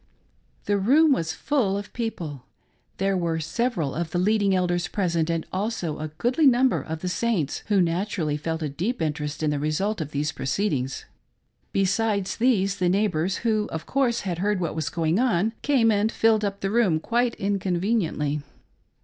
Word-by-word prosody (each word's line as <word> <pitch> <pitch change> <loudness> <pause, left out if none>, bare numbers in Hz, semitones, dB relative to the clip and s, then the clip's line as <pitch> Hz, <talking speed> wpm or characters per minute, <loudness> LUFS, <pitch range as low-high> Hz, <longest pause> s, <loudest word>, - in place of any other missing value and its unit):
The 205 -1 +1
room 290 +10 +5
was 165 -11 +1
full 200 - 0
of 205 0 -7
people. 165 - -4 0.5
There 195 0 +1
were 170 -3 0
several 165 - -1
of 170 0 -3
the 175 - -2
leading 200 +1 +2
elders 175 -1 0
present, 170 -5 0
and 165 -1 -1
also 185 -5 -2
a 155 - -3
goodly 245 - +1
number 255 0 +4
of 160 0 -6
the 185 - -3
Saints, 180 -6 -1
who 205 -2 +3
naturally 175 -2 0
felt 160 +2 -3
a - - 0
deep 185 - -2
interest 150 -1 -2
in 150 - +2
the 145 - -1
result 165 +7 -1
of 150 - -4
these 150 +1 -1
proceedings; 135 -4 -2 0.7
besides 200 0 0
these, 205 -5 +2
the 180 -2 +1
neighbors 185 -2 +1
who, 215 -2 +1
of 160 0 -5
course, 255 -4 +1
had 175 -3 -3
heard 205 +1 +1
what 170 -3 -2
was 155 -2 -2
going 160 +5 0
on, 225 -4 +2
came 250 -6 +3
and 210 +1 +2
filled 220 -2 +3
up 200 -1 -2
the 195 - -1
room 205 -9 +3
quite 240 +6 0
inconveniently. 185 -6 0
190 Hz, 175 wpm, -25 LUFS, 160-220 Hz, 0.7 s, room